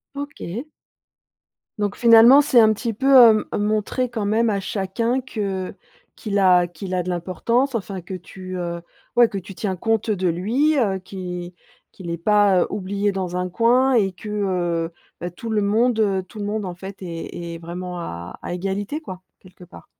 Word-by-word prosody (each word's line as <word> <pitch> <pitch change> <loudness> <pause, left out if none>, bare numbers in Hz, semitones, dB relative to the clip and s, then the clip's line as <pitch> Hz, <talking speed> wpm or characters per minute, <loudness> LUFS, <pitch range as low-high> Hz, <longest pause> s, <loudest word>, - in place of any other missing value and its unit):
OK. 280 - -6 1.1
Donc 205 -1 -2
finalement 235 +3 +8
c'est 280 -4 +4
un 220 0 +5
petit 230 +2 -2
peu, 265 +6 -2
heu, 225 -4 +7
m - - -2
montrer 215 +4 0
quand 220 -4 -3
même 225 +2 +2
à 200 -2 0
chacun 220 +6 -1
que 200 -7 -4 0.4
qu'il 205 -3 -2
a 180 -2 +5
qu'il 180 +2 -7
a 180 -1 0
de 180 - -5
l'importance, 230 +9 0
enfin 195 -3 -4
que 180 +2 -9
tu, 185 +1 -8
heu 170 -1 -3 0.4
ouais, 240 -1 +7
que 200 - -5
tu 195 +1 -8
tiens 190 -1 -2
compte, 225 +4 0
heu, 215 - +1
de 185 -1 0
lui, 240 - +1
heu, 195 -6 +1
qu'il 180 -2 -7 0.4
qu'il 175 -3 -9
est 170 - -2
pas 200 0 +3
oublié 200 +1 -1
dans 185 -2 -4
un 180 0 -2
coin 245 +6 +3
et 200 -6 +2
que, 210 +4 -9
heu, 175 -5 -1 0.3
bah, 175 - -4
tout 225 +6 -8
le 215 -1 +1
monde, 220 +3 +2
heu, 195 -3 +1
tout 210 - -12
le 205 - -3
monde, 210 0 -2
en 180 -1 -5
fait, 190 +2 -8
est 170 -1 -6
est - - -6
vraiment 175 +1 -6
à 85 - -7
à - - -5
égalité, 195 - -3
quoi, 185 - -9 0.2
quelque 185 -1 -16
part. 175 - -15
195 Hz, 190 wpm, -22 LUFS, 180-225 Hz, 1.1 s, finalement